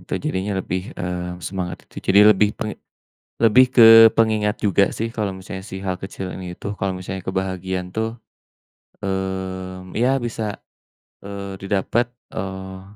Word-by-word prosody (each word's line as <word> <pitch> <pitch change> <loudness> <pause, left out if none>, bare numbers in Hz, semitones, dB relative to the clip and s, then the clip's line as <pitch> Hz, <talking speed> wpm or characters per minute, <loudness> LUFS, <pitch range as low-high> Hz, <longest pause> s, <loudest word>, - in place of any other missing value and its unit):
Itu - - -15
jadinya 100 -9 -1
lebih, 90 0 -2 0.2
eee, 90 0 -4
semangat 90 -2 -5
itu - - -26
jadi 100 +2 +7
lebih 105 +1 +3
ke - - -4 0.8
lebih 125 +4 +7
ke 120 - +7 0.3
pengingat 110 -2 +2
juga 100 0 +4
sih 115 - -2
kalau 105 -4 -2
misalnya 95 0 -8
si 95 - -5
hal 95 -1 -1
kecil 95 0 -6
ini 90 -2 -7
tuh, 100 - -3
kalau 95 0 -1
misalnya 95 +1 -5
kebahagiaan 95 -1 -2
tuh, 110 0 0 0.9
eee, 95 -1 -4
ya 125 - +4 0.2
bisa, 115 -1 -4 0.8
eee, 100 -1 -7
didapat, 100 +5 0 0.3
eee, 95 0 -6
95 Hz, 145 wpm, -21 LUFS, 95-105 Hz, 0.9 s, jadi